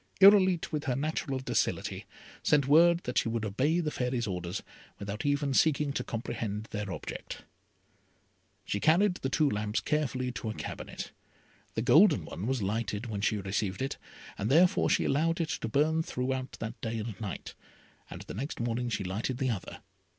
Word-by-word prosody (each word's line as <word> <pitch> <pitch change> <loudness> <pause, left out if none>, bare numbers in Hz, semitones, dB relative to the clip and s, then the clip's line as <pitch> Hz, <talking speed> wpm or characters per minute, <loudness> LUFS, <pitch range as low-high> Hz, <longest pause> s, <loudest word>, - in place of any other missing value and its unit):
Irolite, 190 -3 +6
with 150 -1 -2
her 130 -4 0
natural 145 -1 -1
docility, 125 -4 -1 0.3
sent 145 -2 +3
word 170 +4 +6
that 125 - +1
she - - -1
would 115 -1 -1
obey 135 - +1
the 155 -3 -1
Fairy's 125 -3 -1
orders, 90 -2 -4 0.3
without 100 +6 -4
even 145 -1 +1
seeking 150 0 +3
to 125 - -2
comprehend 110 -3 -4
their 105 -2 -3
object. - - -6 1.2
She 100 - -1
carried 180 - +4
the 135 - -2
two 150 +2 +3
lamps 105 -2 0
carefully 130 -4 -1
to 115 -2 -5
a 110 - -4
cabinet. - - -6 0.6
The - - 0
golden - - +6
one 95 +6 -5
was 130 -4 0
lighted 105 +2 -2
when 105 -4 -4
she 105 +1 +1
received 100 0 -2
it, 135 - -3 0.4
and 105 - -1
therefore 175 +5 +4
she - - +2
allowed 165 +5 +1
it 165 -2 -1
to 160 -8 -2
burn 155 +6 +2
throughout 130 -3 -3
that 110 0 -6
day 115 0 -2
and 110 -2 -5
night, 105 -4 -5 0.6
and - - -8
the - - -8
next 135 +9 -4
morning 120 +1 -1
she 105 -3 -2
lighted 105 +7 -2
the 130 -2 0
other. 100 -5 -6
125 Hz, 175 wpm, -30 LUFS, 105-150 Hz, 1.2 s, Irolite